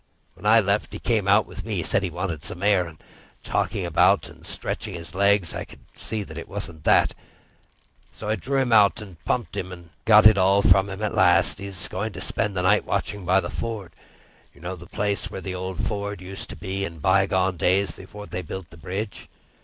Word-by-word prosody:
When 105 - -6
I 115 +2 +7
left, 100 0 0
he - - -4
came 110 -5 0
out 100 +2 +5
with - - -9
me—said 100 -3 0
he 95 - -2
wanted 85 -3 -4
some 90 +3 -5
air, 100 -4 +3
and 80 -1 -12 0.5
talked - - -1
about - - +3
stretching - - -4
his 85 +1 -8
legs. 100 -2 +2
But - - -4
I - - -5
could - - -17
see 110 -1 -4
it 85 -4 -8
wasn't 85 -6 -6
that, - - +4 1.0
so 105 - -8
I 110 - +1
drew 130 +7 -2
him 130 -3 +2
out 105 0 +5
and 95 -7 -11
pumped - - -1
him, 95 - -4
and 85 -2 -11
got 110 -1 +7
it 110 -2 +8
all 100 +2 +4
from 95 +2 +5
him 95 +2 -6
at 105 - -1
last. - - +4
He 100 - -6
was 95 -2 -4
going 105 +3 -4
to 90 - -7
spend 105 +1 -1
the 90 - -1
night 100 +3 +4
watching 100 -1 -2
by 95 +2 +4
the - - -5
ford. 110 -6 -4 0.6
You 70 - -18
know 90 +2 -4
the 90 0 -12
place 100 +2 -2
where - - -6
the 95 -1 -5
old 95 0 -5
ford 100 -2 -2
used 95 +1 -8
to - - -7
be, 95 0 -4
in 85 -4 -5
by 95 +4 +3
gone 95 -1 +1
days 95 +1 +2
before 105 +5 -11
they 90 - -5
built 95 -1 -7
the 85 - -13
bridge?" 95 +7 -5
95 Hz, 220 wpm, -24 LUFS, 90-105 Hz, 1.0 s, it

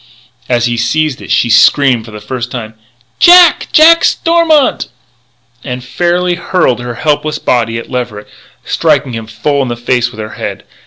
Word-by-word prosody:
As 120 -1 +1
he 120 -1 -2
seized 130 +4 -1
it - - -11
she 120 - +1
screamed 120 0 +3
for - - -12
the 105 - -9
first 125 +2 -6
time: 110 -3 -7 0.5
"Jack! 350 -2 +6
Jack 330 +2 +5
Stormont!" 330 -4 +1 0.8
and 125 -2 -6
fairly 175 +7 -1
hurled 175 -7 -1
her 120 -1 -6
helpless 155 +1 -1
little - - -18
body 115 -2 0
at 115 - -7
Leverett, 120 -5 -5 0.4
striking 140 -3 0
him 115 -1 -6
full 140 +6 -2
in 130 - -2
the 120 - -3
face 120 0 -1
with 120 - -14
her 110 0 -6
head. - - -6
125 Hz, 170 wpm, -11 LUFS, 120-155 Hz, 0.8 s, Jack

